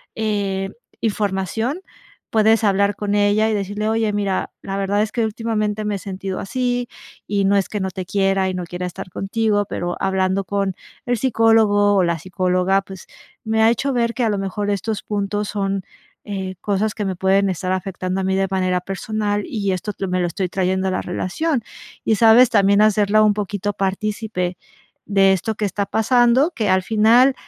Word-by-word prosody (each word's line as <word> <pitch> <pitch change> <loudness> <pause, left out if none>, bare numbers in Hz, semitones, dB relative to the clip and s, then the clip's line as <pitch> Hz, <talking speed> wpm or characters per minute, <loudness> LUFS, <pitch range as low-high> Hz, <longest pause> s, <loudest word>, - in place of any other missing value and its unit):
eh, 200 -3 -1 0.3
información 215 - -1 0.5
puedes 220 +1 +3
hablar 200 0 +2
con 205 0 -2
ella 205 +2 +3
y - - 0
decirle: 205 +2 -2
"Oye, 220 -1 0
mira, 200 -2 -1
la 195 0 -4
verdad 200 +1 +1
es 215 0 -1
que 230 -2 0
últimamente 215 -1 -2
me 210 -1 -1
he - - -2
sentido 190 0 -5
así, 245 +2 -2 0.4
y 200 -1 +1
no 200 +1 +3
es 195 - 0
que 210 - -3
no 190 - -1
te 185 0 -5
quiera 195 0 +1
y - - -3
no 180 -1 -4
quiera 175 +1 -5
estar 180 +1 -8
contigo, 205 +1 0
pero 175 -2 -3
hablando 190 0 0
con 195 -1 -1 0.3
el 245 0 +1
psicólogo 220 -4 +3
o 190 - +4
la 170 -1 0
psicóloga, 185 +2 +1
pues 190 -2 -11 0.4
me 220 0 +1
ha 225 - +6
hecho 270 +4 -1
ver 235 -1 +1
que 250 - -1
a 225 - +2
lo 205 - 0
mejor 195 +1 -3
estos 205 +2 -2
puntos 205 0 -2
son, 195 -1 -1 0.4
eh, 190 -2 -4
cosas 205 +1 0
que 210 - -3
me 190 - -2
pueden 195 +1 +2
estar 185 +1 -2
afectando 185 0 -3
a - - -2
mí 190 0 +1
de 195 0 +1
manera 185 -1 +1
personal 205 +2 -2
y 200 -4 -2
esto 185 +3 -3 0.2
me 185 0 0
lo 175 - +1
estoy 180 +1 -3
trayendo 190 0 0
a - - -1
la 185 - -1
relación", 235 - -2 0.4
y, 220 - +3
¿sabes? 230 +3 +7
también 200 -1 +4
hacerla 215 0 +4
un 210 -1 +4
poquito 205 0 -3
partícipe 195 -1 -2 0.5
de 195 -1 +5
esto 200 +4 -2
que 215 - -4
está 200 +1 -2
pasando, 240 - +3
que 225 -10 -2
al 185 0 +3
final 230 +6 +4
200 Hz, 190 wpm, -20 LUFS, 190-220 Hz, 0.5 s, sabes